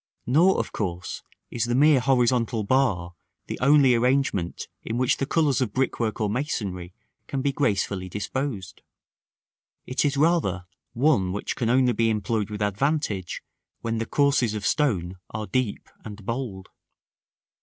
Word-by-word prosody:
Nor, 165 +10 +4
of - - -2
course, 90 -4 -4 0.3
is 120 -1 -1
the 120 0 0
mere 145 +1 +5
horizontal 125 -3 +2
bar 100 -8 +1 0.3
the - - -6
only 140 -1 +5
arrangement 120 -7 0
in 115 - -4
which 125 0 +2
the 135 - -2
colors 150 -6 +2
of 110 -5 -1
brickwork 120 -4 -1
or 105 - +1
masonry 100 - -3 0.4
can 135 -1 -3
be 140 - +2
gracefully 100 -8 -1
disposed. 105 -1 -4 1.0
It 130 - -1
is 145 -1 +1
rather 145 - +2 0.3
one 115 -9 +2
which 105 - -3
can 115 - -1
only 125 0 +3
be 115 +1 +2
employed 110 -1 -1
with 105 0 -3
advantage 105 - -1 0.4
when 115 0 -2
the 115 - -3
courses 140 -6 +2
of 105 -2 -4
stone 95 - 0
are 110 0 -4
deep 115 +1 -2 0.2
and 105 -2 -9
bold. 115 -6 -4
115 Hz, 145 wpm, -25 LUFS, 100-135 Hz, 1.0 s, mere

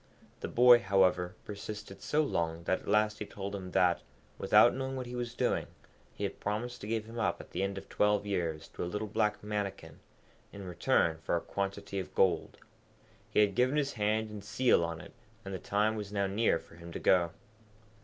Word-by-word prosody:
The - - -4
boy, 120 0 +7
however, 95 -3 +2
persisted 105 -1 -7
so 155 +1 +1
long 85 - -1
that 95 - +1
at - - -16
last 105 +1 +2
he 105 - -3
told 100 0 -6
him 95 -2 -5
that, 90 0 +3 0.4
without - - +6
knowing 135 0 -3
what 130 -1 -4
he 125 0 -7
was 120 -1 -4
doing, - - 0 0.5
he - - -5
had 100 - -3
promised 115 +4 -3
to 105 - -6
give 110 0 -1
him 115 +1 -7
up - - 0
at - - -12
the 90 - -2
end 100 0 -1
of 95 - -8
twelve 105 0 +2
years 85 -6 -2
to - - -5
a 85 - -3
little 105 +3 -3
black 105 0 0
Mannikin, 100 -7 -4 0.5
in 100 -1 -8
return 85 -2 +1
for 80 - -1
a - - +2
quantity 100 +1 -3
of 95 - -7
gold. 95 -2 +2 0.7
He - - +3
had 100 -1 +3
given 130 +7 +2
his 140 -2 0
hand 110 0 0
and 105 -2 -8
seal 120 -3 +3
on 85 -1 -3
it, - - -13 0.3
and 95 - -5
the 95 - -4
time 105 +2 +1
was 105 -2 -5
now 100 -1 0
near 100 -1 +2
for 85 - -15
him 85 0 -10
to - - -4
go. 90 -2 +4
100 Hz, 210 wpm, -31 LUFS, 95-110 Hz, 0.7 s, boy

